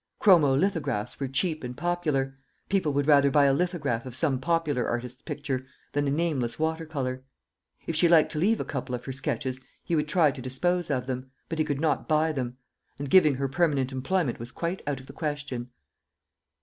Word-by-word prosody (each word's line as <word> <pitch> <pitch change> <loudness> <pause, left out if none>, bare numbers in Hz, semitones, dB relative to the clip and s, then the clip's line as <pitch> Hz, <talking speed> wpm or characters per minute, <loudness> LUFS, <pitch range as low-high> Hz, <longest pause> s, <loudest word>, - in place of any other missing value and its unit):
Chromolithographs 145 - +3
were 135 - -1
cheap 155 +3 -1
and 125 0 -6
popular 155 -7 0 0.3
people 190 -6 +2
would 145 0 +1
rather 140 -2 +6
buy 145 +1 +5
a 135 - +4
lithograph 145 -8 0
of 125 - -8
some 140 -4 +1
popular 150 -4 0
artist's 125 +2 -4
picture 135 -3 -3 0.3
than 145 0 0
a - - +2
nameless 140 -7 0
water 160 +1 -1
colour. 130 -4 -3 0.6
If 165 - -2
she 170 +2 +4
liked 165 -2 +5
to 155 - -2
leave 215 +7 +3
a - - -2
couple 130 -3 -3
of 125 - -8
her 135 - -4
sketches, 130 -1 -3 0.2
he 170 - -1
would 150 -1 +1
try 155 -2 +4
to 130 - -8
dispose 175 +8 -1
of 130 -3 0
them, 130 0 -4 0.2
but 165 - -3
he 155 - +3
could 145 -2 -2
not 160 0 0
buy 155 +1 +3
them 125 -4 -3 0.4
and 140 -1 -5
giving 155 -7 +6
her 135 +1 -1
permanent 140 -3 +1
employment 130 +2 -1
was 120 +2 -6
quite 170 +6 -3
out 140 -3 -1
of 130 - -12
the - - -11
question. 145 -5 -4
145 Hz, 200 wpm, -27 LUFS, 130-160 Hz, 0.6 s, rather